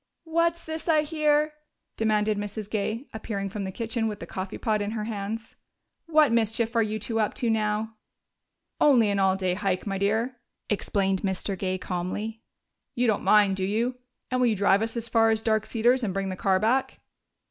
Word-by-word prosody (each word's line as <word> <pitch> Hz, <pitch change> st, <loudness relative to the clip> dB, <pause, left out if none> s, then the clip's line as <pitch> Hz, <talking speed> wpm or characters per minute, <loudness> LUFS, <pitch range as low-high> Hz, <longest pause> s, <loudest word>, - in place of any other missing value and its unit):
"What's 335 Hz, +1 st, 0 dB
this 320 Hz, +1 st, -6 dB
I 310 Hz, -2 st, +4 dB
hear?" 300 Hz, -1 st, +1 dB, 0.4 s
demanded 215 Hz, -1 st, +1 dB
Mrs. 205 Hz, 0 st, -5 dB
Gay, 220 Hz, +4 st, -2 dB
appearing 200 Hz, -3 st, -4 dB
from 200 Hz, -1 st, -4 dB
the 190 Hz, -, -4 dB
kitchen 225 Hz, +2 st, -2 dB
with 210 Hz, -1 st, -4 dB
the -, -, -6 dB
coffee 190 Hz, -1 st, -5 dB
pot 215 Hz, -2 st, 0 dB
in 205 Hz, -, -2 dB
her 215 Hz, -, -2 dB
hands. 215 Hz, +1 st, -5 dB, 0.5 s
"What 310 Hz, -5 st, +4 dB
mischief 230 Hz, 0 st, +1 dB
are 230 Hz, -, +4 dB
you 215 Hz, 0 st, -1 dB
two 225 Hz, +2 st, -2 dB
up 215 Hz, -, 0 dB
to 235 Hz, -2 st, 0 dB
now?" 215 Hz, 0 st, 0 dB, 0.9 s
"Only 240 Hz, -8 st, +5 dB
an 200 Hz, -, 0 dB
all 190 Hz, -1 st, +3 dB
day 185 Hz, -2 st, 0 dB
hike, 190 Hz, -1 st, -1 dB
my 195 Hz, -2 st, -2 dB
dear," 220 Hz, +6 st, 0 dB, 0.3 s
explained 195 Hz, -2 st, 0 dB
Mr. 195 Hz, 0 st, -2 dB
Gay 185 Hz, 0 st, -2 dB
calmly. 190 Hz, +5 st, -4 dB, 0.5 s
"You 245 Hz, -, +1 dB
don't 220 Hz, -4 st, +2 dB
mind, 200 Hz, -1 st, +4 dB
do 190 Hz, -, -2 dB
you? 225 Hz, +6 st, 0 dB, 0.4 s
And 255 Hz, 0 st, +1 dB
will 250 Hz, -, +4 dB
you 225 Hz, -, +2 dB
drive 200 Hz, 0 st, +3 dB
us 225 Hz, +1 st, -2 dB
as 230 Hz, 0 st, -2 dB
far 225 Hz, -1 st, +4 dB
as 220 Hz, 0 st, +1 dB
Dark 220 Hz, -1 st, +1 dB
Cedars 240 Hz, +3 st, +2 dB
and 195 Hz, -4 st, -2 dB
bring 195 Hz, 0 st, -1 dB
the 185 Hz, -, -3 dB
car 190 Hz, 0 st, +2 dB
back?" 240 Hz, +6 st, +1 dB
215 Hz, 195 wpm, -26 LUFS, 200-235 Hz, 0.9 s, Only